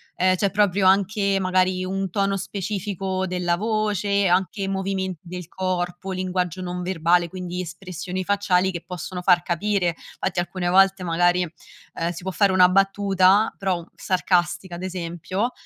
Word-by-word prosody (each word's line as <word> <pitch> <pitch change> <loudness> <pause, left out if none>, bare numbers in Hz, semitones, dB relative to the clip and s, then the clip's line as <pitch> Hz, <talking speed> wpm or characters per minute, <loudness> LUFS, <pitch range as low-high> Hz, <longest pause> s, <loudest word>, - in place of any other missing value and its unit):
ehm, 185 +1 +3
c'è 195 +1 0
proprio 200 -2 +2
anche, 200 +1 +2
magari, 185 0 +1
un 195 0 -2
tono 195 0 0
specifico 195 -1 -3
della 180 -1 0
voce, 205 -1 0
anche 190 +2 +1
movimenti 190 -3 -3
del 180 -1 -7
corpo, 185 0 -3
linguaggio 185 -1 -2
non 180 0 -4
verbale, 175 -1 +2
quindi 180 -1 -5
espressioni 180 +1 -5
facciali 190 -2 +2
che 170 -2 -6
possono 180 +1 -6
far 175 -1 +5
capire. 180 0 0 0.2
Fatti 185 - -1
alcune 175 0 -2
volte 195 +1 +4
magari, 175 +1 +2 0.5
ehm, 170 +1 -1
si 170 - -8
può 190 - -3
fare 200 +1 +3
una 180 -1 +6
battuta, 195 +1 +3
però 190 -3 -1
u - - -14
sarcastica, 180 -1 0
ad 175 - -7
esempio, 185 +4 -3
185 Hz, 150 wpm, -23 LUFS, 180-195 Hz, 0.5 s, una